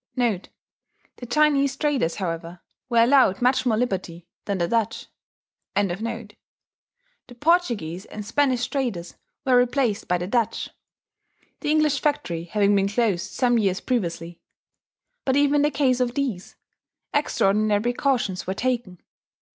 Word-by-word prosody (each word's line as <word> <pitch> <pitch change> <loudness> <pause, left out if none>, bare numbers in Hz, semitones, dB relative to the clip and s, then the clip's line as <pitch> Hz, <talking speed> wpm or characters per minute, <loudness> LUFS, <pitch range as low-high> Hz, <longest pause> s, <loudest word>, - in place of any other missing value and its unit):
* - - -50
[*The 230 -7 0 0.8
Chinese 280 -1 +3
traders, 275 - 0
however, 170 -2 -5 0.3
were 235 -1 +5
allowed 250 -6 +4
much 255 +1 +2
more 220 -3 +2
liberty 185 -7 -3 0.2
than 200 -2 -1
the 170 -1 0
Dutch.] 225 +1 -1 0.7
The 210 +3 -2 1.1
Portuguese 235 - +1
and 210 -1 -8
Spanish 255 +1 +1
traders 230 -12 -3 0.3
were 260 -2 +4
replaced 245 -3 0
by 180 - +2
the 175 - -4
Dutch 230 +3 -1 0.9
(the - - -3
English 305 -2 +3
factory 175 - -1
having 205 +2 +2
been 195 0 +2
closed 200 -4 0
some 245 -2 +2
years 195 -3 +1
previously); 170 -8 -3 0.8
but 265 - +1
even 290 0 +3
in - - +3
the 295 - +3
case 265 -4 +1
of 245 -1 0
these, 255 -11 -3 0.6
extraordinary 210 -7 +2
precautions 240 -7 0
were 190 - -2
taken. 235 -7 -2
230 Hz, 130 wpm, -24 LUFS, 190-265 Hz, 1.1 s, were